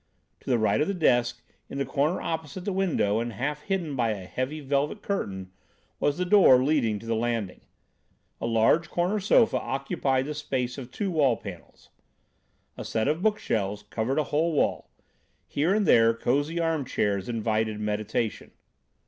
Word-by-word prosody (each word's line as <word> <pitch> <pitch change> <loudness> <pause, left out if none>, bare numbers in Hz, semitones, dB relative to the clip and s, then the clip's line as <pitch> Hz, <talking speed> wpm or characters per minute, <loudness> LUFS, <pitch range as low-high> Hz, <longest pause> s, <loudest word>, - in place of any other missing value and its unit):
To - - -10
the 125 - +3
right 110 0 +2
of 150 - +1
the 200 - -1
desk 120 -7 +2 0.3
in - - -6
the 140 - 0
corner 150 +5 0
opposite 160 +2 -4
the 200 - -1
window 165 - +1
and 120 0 -3
half 145 +7 -3
hidden 175 -5 -2
by 120 -3 +1
a 95 -3 -8
heavy 130 +10 -3
velvet 145 +6 -1
curtain 95 - -3 0.5
was 145 0 +1
the 180 - 0
door 180 -10 +6
leading 130 -7 +1
to 115 - -11
the 115 - -1
landing. 115 -4 -2 0.8
A - - -1
large 115 +9 +3
corner 180 +5 0
sofa 220 +3 +3
occupied 135 -1 -1
the 150 - -4
space 135 -4 -3
of 125 -2 -8
two 190 +9 -3
wall 140 -8 +3
panels. 90 -5 -11 0.9
A - - -5
set 110 +3 -1
of 155 +4 0
book 215 +1 +2
shelves 105 - -2
covered 110 +6 -2
a 155 - +3
whole 160 +3 +2
wall. 145 - 0 0.6
Here 155 +6 0
and 210 -1 +2
there 115 -6 +5
cosy 145 +8 0
armchairs 135 - -1
invited 110 -2 -1
meditation. 105 +1 -2
135 Hz, 170 wpm, -26 LUFS, 115-160 Hz, 0.9 s, door